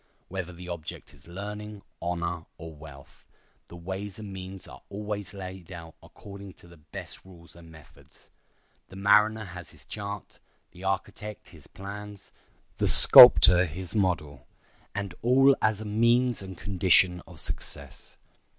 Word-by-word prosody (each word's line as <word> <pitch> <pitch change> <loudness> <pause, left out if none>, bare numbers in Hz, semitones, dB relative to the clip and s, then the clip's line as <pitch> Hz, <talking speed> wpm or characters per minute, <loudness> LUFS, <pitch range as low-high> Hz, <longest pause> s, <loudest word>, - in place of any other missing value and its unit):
Whether 95 -1 -5
the 90 +1 -11
object 85 -5 -8
is 70 +2 -21
learning, 105 +3 -8 0.2
honor, 85 -1 -4
or 80 -1 -10
wealth, 75 -3 -15 0.4
the - - -13
ways 95 +3 -7
and 105 -3 -9
means 95 0 -9
are - - -13
always 105 0 -5
laid 95 -2 -9
out 85 -2 -10
according 100 -1 -12
to 85 - -20
the 85 0 -17
best 75 - -11
rules 85 -3 -16
and 85 -1 -15
methods. 80 -2 -19 0.6
The 95 - -14
mariner 105 +3 +3
has 90 -3 -10
his - - -19
chart, 100 -1 -8 0.3
the 90 - -14
architect 100 +2 -5
his - - -17
plans, 100 +1 -10 0.5
the - - +1
sculptor 90 0 +9
his 85 +3 -8
model, 85 -10 -2 0.5
and 100 -3 -4
all 135 +3 +4
as 110 -1 +1
a - - -7
means 120 +3 +1
and 95 -2 -9
condition 90 -2 +2
of 85 -4 -13
success. - - -4
95 Hz, 145 wpm, -27 LUFS, 85-105 Hz, 0.6 s, sculptor